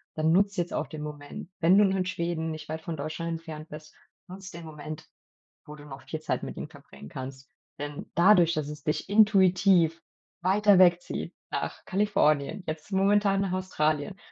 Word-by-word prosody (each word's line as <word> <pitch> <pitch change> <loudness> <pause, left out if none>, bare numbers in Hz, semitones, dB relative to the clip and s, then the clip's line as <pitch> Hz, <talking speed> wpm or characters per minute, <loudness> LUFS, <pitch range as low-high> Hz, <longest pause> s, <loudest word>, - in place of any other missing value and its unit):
dann 160 +1 +2
nutz 200 +2 +2
jetzt 175 -1 -2
auch - - -2
den 155 -2 -8
Moment. 150 +2 -8
Wenn 175 +4 +5
du 205 - +6
nun 195 0 +1
in 185 - 0
Schweden 170 -2 -2
nicht 155 0 -7
weit 160 +1 -5
von 165 0 -5
Deutschland 155 +3 -4
entfernt 160 -2 -7
bist, 155 0 -11 0.3
nutz 190 +1 -9
den 170 0 -9
Moment, 155 0 -8 0.6
wo 150 - -10
du 145 - -13
noch 140 -2 -10
viel 155 - -5
Zeit - - -2
mit - - -6
ihnen - - -6
bringen 70 - -14
kannst. 130 - -8 0.3
Denn 145 0 -6
dadurch, 175 -2 +5
dass 155 -2 -2
es 150 -1 -9
dich 150 - -2
intuitiv 190 -5 +4 0.4
weiter 200 +2 +4
wegzieht 175 -1 +2 0.2
nach - - -4
Kalifornien, 185 -4 +1
jetzt 155 +5 -6
momentan 195 0 +3
nach 195 -2 -1
Australien, 180 -2 -1
165 Hz, 180 wpm, -27 LUFS, 150-190 Hz, 0.6 s, du